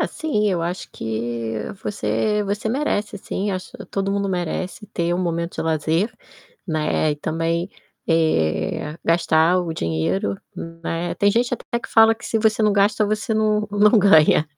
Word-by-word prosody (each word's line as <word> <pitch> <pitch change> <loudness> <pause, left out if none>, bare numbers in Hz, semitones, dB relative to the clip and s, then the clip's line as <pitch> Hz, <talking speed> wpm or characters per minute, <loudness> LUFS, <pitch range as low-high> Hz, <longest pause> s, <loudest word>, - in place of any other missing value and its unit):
Assim 210 -10 0
eu 175 -3 -1
acho 175 +2 -4
que 115 0 -3 0.3
você 205 - 0
você 205 +2 -2
merece 215 -7 -1
sim, 200 +1 -3
acho 185 -1 -5
que - - -9
todo 195 0 -2
mundo 200 0 0
merece 185 +3 -3
ter 170 -4 -1
um - - -1
momento 170 -1 -2
de - - -2
lazer, 160 +5 0 0.6
né, 155 -1 0
e 145 - -6
também, 165 +4 -1 0.4
eh, 150 - +1
gastar 165 +1 +3
o 175 -2 -2
dinheiro, 90 - -1 0.4
né. 165 +1 -2
Tem 205 - +3
gente 240 +3 +1
até 235 - -4
que - - -9
fala 225 0 +6
que 230 - -14
se 225 - 0
você 220 0 +2
não 210 -1 +4
gasta 205 +2 +3
você 215 +1 -1
não 215 -1 +1
não 210 +2 +5
ganha. 160 -5 +5
180 Hz, 165 wpm, -22 LUFS, 160-210 Hz, 0.6 s, fala